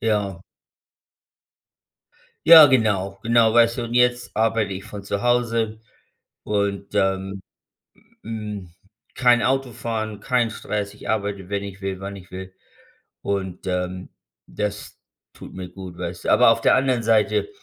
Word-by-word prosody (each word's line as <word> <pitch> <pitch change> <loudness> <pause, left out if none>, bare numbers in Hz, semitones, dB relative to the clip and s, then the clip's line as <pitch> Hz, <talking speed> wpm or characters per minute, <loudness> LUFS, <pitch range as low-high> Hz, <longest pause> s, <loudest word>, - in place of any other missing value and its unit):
ja. 100 -5 -1 2.0
Ja, 160 -2 +11
genau. 100 -7 +1
Genau, 115 -1 +3
weißt 115 0 +4
du. 120 - -2
Und 115 - -6
jetzt 125 -1 +1
arbeite 110 -2 +1
ich 95 0 -6
von 100 -1 -9
zu 100 0 -3
Hause 115 -3 0 0.7
und, 100 -1 -2
ähm, 95 0 -1 0.8
hm, 105 -5 -6 0.4
kein 120 -2 +3
Autofahren, 115 -5 -2
kein 120 +1 +1
Stress. 105 -2 -4
Ich - - -11
arbeite, 100 -3 -2
wenn 100 0 -2
ich 100 -1 -8
will, 95 -1 -4
wann 100 +1 -6
ich 95 0 -13
will. 95 0 -8 0.7
Und, 95 -2 -4
ähm, 90 0 -3 0.4
das 105 -1 -5 0.3
tut - - -12
mir 90 -1 -7
gut, 90 -1 -10
weißt - - -6
du. - - 0
Aber - - +6
auf - - +3
der - - +4
anderen 130 -2 +1
Seite, 110 - +2
105 Hz, 140 wpm, -22 LUFS, 95-115 Hz, 2.0 s, Ja